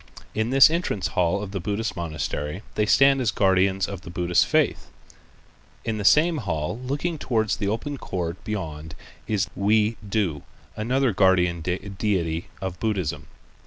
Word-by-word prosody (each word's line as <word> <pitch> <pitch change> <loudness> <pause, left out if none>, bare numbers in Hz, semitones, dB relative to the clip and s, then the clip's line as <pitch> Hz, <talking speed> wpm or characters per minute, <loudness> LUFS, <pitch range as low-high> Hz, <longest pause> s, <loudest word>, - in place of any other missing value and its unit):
In 110 +2 -1
this 135 +3 +7
entrance 165 - -1
hall 90 +3 +1
of 100 - -7
the 100 - -3
Buddhist 105 +5 -2
monastery 75 +1 -4
they 105 0 0
stand 135 +3 +5
as 120 - +1
guardians 95 -1 +2
of 100 -3 -6
the 95 - -10
Buddhist 90 0 +2
faith. - - +1 1.0
In 110 -2 -2
the - - -3
same 160 - +5
hall 85 - -3
looking 145 +6 -3
toward 110 -5 0
the 105 -1 -1
open 130 +7 -3
court 85 -1 -4
beyond 80 -8 -5 0.3
is 100 -3 0
Wei 105 +2 +2
To, 95 -9 0 0.3
another 125 +2 +1
guardian 90 -3 +3
deity 90 -2 -2
of 95 -2 -4
Buddhism. 100 -8 -2
100 Hz, 150 wpm, -24 LUFS, 90-110 Hz, 1.0 s, this